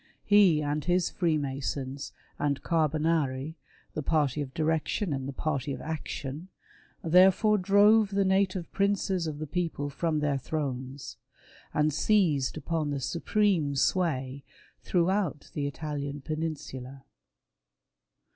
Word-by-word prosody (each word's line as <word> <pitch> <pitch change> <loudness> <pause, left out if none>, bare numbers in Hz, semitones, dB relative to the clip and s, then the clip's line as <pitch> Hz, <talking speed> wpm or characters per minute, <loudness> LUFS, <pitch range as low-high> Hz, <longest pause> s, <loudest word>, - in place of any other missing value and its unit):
He 190 -7 +5
and 145 +1 -1
his 180 0 +1
Freemasons 140 -4 -2 0.3
and 145 -1 -1
Carbonari 155 -2 0 0.2
— - - -33
the 155 - -3
party 150 -2 +1
of 135 -2 -5
direction 160 +3 0
and 135 -1 -3
the - - -3
party 140 0 -2
of - - -6
action 155 0 -5 0.3
— - - -26 0.2
therefore 190 +5 +5
drove 205 +3 +5
the 200 0 +1
native 190 -2 +1
princes 195 -3 0
of 150 -2 -4
the 155 - -4
people 155 -3 -2
from 160 +2 -1
their 145 -2 0
thrones, 135 -2 -4 0.5
and 150 0 +1
seized 155 -8 +2
upon 160 0 -2
the 140 -1 -2
supreme 170 +2 +1
sway 135 -3 0 0.4
throughout 180 -3 0
the 145 -1 -2
Italian 145 -1 -5
peninsula. 140 -4 -5
155 Hz, 125 wpm, -28 LUFS, 140-180 Hz, 0.5 s, He